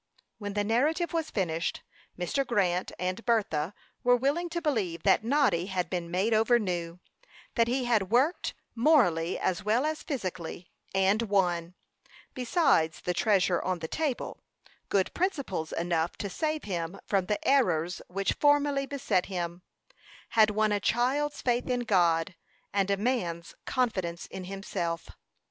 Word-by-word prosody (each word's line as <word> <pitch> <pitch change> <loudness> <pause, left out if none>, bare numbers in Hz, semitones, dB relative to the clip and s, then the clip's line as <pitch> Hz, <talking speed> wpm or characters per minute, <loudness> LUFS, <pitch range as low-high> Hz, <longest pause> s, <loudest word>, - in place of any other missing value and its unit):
When 205 -2 -4
the 205 0 0
narrative 295 - +1
was 325 -2 -1
finished, 170 -4 -2 0.3
Mr. 180 +10 0
Grant, 185 -7 0
and 185 +4 -3
Bertha 200 -7 0 0.3
were 245 0 +5
willing 285 +8 0
to 340 +1 -2
believe 220 - -1
that 195 +1 +4
Noddy 230 - +2
had 180 -3 -2
been 175 -2 -2
made 190 +6 +1
over 225 +3 +4
new; 175 -5 -3 0.5
that 230 -1 +3
he 250 +1 0
had 215 -6 +2
worked, 265 - +2 0.2
morally 225 - +3
as 180 -2 -1
well 225 +7 +2
as 310 0 -2
physically, 185 - -5 0.2
and 195 +3 +3
won, 180 -5 0 0.6
besides 245 - +2
the 180 - -1
treasure 185 -2 +2
on 185 -1 -1
the 160 -1 -5
table, 295 - -3 0.5
good 195 -2 +1
principles 280 - -2
enough 170 -1 -1
to 200 - -4
save 310 - -1
him 175 -1 -4
from 195 -3 +1
the 210 - -2
errors 180 - +2
which 195 +2 -1
formerly 290 -1 +2
beset 265 -10 0
him; 175 -2 -4 0.7
had 220 -2 +5
won 215 0 +1
a 205 - +2
child's 265 +8 0
faith 245 +1 +1
in 250 -1 +1
God, 175 -5 +2 0.4
and 200 -1 +1
a 200 - +2
man's 185 -7 -2
confidence 185 -9 -1
in 185 - -8
himself. 180 -3 -4
200 Hz, 150 wpm, -29 LUFS, 180-250 Hz, 0.7 s, were